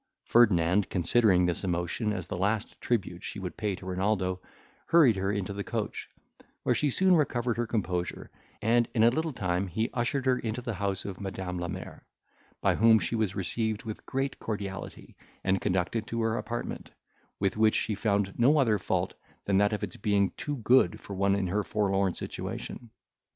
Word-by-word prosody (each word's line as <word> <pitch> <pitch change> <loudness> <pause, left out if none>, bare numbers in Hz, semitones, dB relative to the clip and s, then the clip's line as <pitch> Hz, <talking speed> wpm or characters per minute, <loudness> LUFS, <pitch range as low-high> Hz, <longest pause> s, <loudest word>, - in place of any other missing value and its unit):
Ferdinand, 100 -4 +4
considering 90 0 +3
this 90 +2 -1
emotion 90 +4 -1
as 95 -5 -3
the - - -5
last 105 +4 -1
tribute 95 -7 -1
she - - -5
would 90 -3 -5
pay 105 -3 -1
to 95 - -12
Renaldo, 95 0 0 0.5
hurried 155 -10 +6
her 95 +1 -1
into 100 -1 -2
the 100 0 -4
coach, - - -4 0.5
where - - +3
she 150 - +1
soon 185 +6 +4
recovered 120 -6 +1
her 120 -1 -1
composure; 90 -6 -2 0.3
and 115 +2 +3
in 110 - +4
a 115 - +6
little 160 +4 -1
time 90 -5 -1
he 110 +7 -2
ushered 130 +3 -1
her 130 -1 +3
into 115 +1 -3
the 120 -2 -4
house 100 0 -2
of 100 0 -6
Madam 95 -2 -4
la 85 - -2
Mer, - - -7 0.6
by - - +3
whom 115 0 +6
she 90 +1 -2
was 110 -4 0
received 105 +4 -2
with 110 -2 -6
great 135 +1 -2
cordiality, 100 -3 -6 0.3
and 95 0 +1
conducted 100 +3 -1
to 115 0 -2
her 110 0 +1
apartment, 120 0 -4 0.5
with 100 -1 0
which 110 0 +4
she 110 - +1
found 100 -1 0
no 140 +6 +5
other 115 -7 +3
fault - - -1 0.3
than 100 -1 +3
that 105 +1 +3
of 105 0 -2
its 95 - -5
being 100 -2 +2
too 145 - -4
good 120 -5 +3
for 100 - -9
one 100 +1 +2
in 100 -1 0
her 100 +4 0
forlorn 100 -3 0
situation. 120 - -6
105 Hz, 185 wpm, -29 LUFS, 95-115 Hz, 0.6 s, hurried